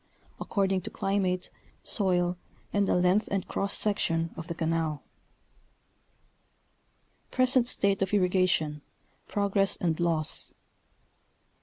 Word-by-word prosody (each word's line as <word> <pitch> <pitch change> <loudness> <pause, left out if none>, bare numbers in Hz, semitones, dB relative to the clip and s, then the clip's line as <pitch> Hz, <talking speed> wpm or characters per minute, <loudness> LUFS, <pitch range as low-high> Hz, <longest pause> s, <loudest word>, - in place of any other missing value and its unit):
according 195 -2 0
to - - -6
climate, 190 -2 -1 0.3
soil, 180 -3 +1 0.4
and 200 -1 +2
the - - +2
length 180 +4 +3
and 195 -2 -1
cross 200 0 -2
section 165 -5 0
of 165 - -7
the 170 - -4
canal. 160 -2 -1 2.3
PRESENT 255 -1 +3
STATE 200 -5 +1
OF 195 - +1
[RRIGATION—PROGRESS 190 +2 0
AND 165 -2 -1
LAWS. 165 -3 0
185 Hz, 100 wpm, -28 LUFS, 165-200 Hz, 2.3 s, length